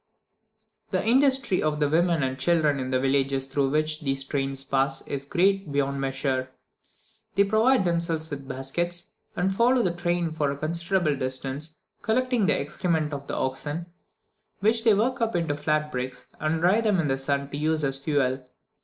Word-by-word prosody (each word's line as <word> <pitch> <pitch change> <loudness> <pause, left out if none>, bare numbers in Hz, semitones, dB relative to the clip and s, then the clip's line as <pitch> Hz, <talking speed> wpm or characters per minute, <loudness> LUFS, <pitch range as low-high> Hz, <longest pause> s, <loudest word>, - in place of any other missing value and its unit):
The 185 0 -1
industry 265 -3 +3
of 155 -1 0
the 150 - +3
women 165 0 +2
and 130 0 -2
children 150 -1 +2
in 130 0 -3
the 130 0 +1
villages 135 0 +1
through 135 0 0
which 155 +1 0
these 135 -2 -1
trains 135 -1 -3
pass 135 0 0
is 140 -1 -4
great 190 +2 +1
beyond 140 -1 0
measure; 135 -1 -1 0.9
they 200 - +5
provide 220 +2 +3
themselves 170 -2 -1
with 140 -2 -6
baskets, 160 +7 -3 0.2
and 190 +2 0
follow 240 +4 +3
the 180 - +1
train 175 -1 -1
for 155 -2 0
a 140 - -3
considerable 170 +1 0
distance, 135 +4 -2 0.2
collecting 245 -2 +1
the - - +2
excrement 155 +1 -1
of 140 0 -6
the - - -3
oxen, 145 +5 -3 0.7
which 225 +3 +2
they 225 -3 +5
work 245 +5 0
up 225 -3 0
into 165 -4 0
flat 150 +1 -1
bricks, 125 -1 -5
and 155 +1 -1
dry 190 +6 +4
them 210 -4 +2
in 160 - +1
the 135 -1 0
sun 140 +1 -1
to 145 - -4
use 155 +1 +1
as 135 -1 +1
fuel. 135 -3 0
155 Hz, 175 wpm, -26 LUFS, 135-180 Hz, 0.9 s, they